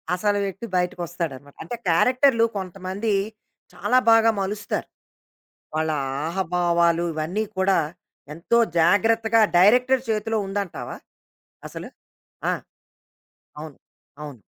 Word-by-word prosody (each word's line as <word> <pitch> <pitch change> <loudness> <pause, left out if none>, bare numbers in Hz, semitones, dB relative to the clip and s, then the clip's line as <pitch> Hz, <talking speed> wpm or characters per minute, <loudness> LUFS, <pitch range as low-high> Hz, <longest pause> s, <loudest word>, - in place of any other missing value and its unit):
అసలు 205 +2 0
వ్యక్తి 195 +3 -6
బయటికొస్తాడనమాట. 170 -6 -3
అంటే, 240 - -5
క్యారెక్టర్లు 250 - +4
కొంతమంది 190 +3 -3 0.6
చాలా 255 - +1
బాగా 225 0 +6
మలుస్తారు. 205 +1 -3 0.9
వాళ్ళ 160 0 0 0.4
ఆహాభావాలు 170 -1 +1
ఇవన్నీ 165 +8 -2
కూడా 190 0 +3 0.6
ఎంతో 175 +9 +1 0.2
జాగ్రత్తగా 225 +6 +3 0.2
డైరెక్టర్ 250 +7 +5
చేతిలో 220 +1 -1
ఉందంటావా 195 -2 -5 0.7
అసలు? - - -8 0.6
ఆ! - - +1 1.1
అవును. 155 -2 -9 0.5
అవును. 145 -6 -9
190 Hz, 90 wpm, -23 LUFS, 170-225 Hz, 1.1 s, బాగా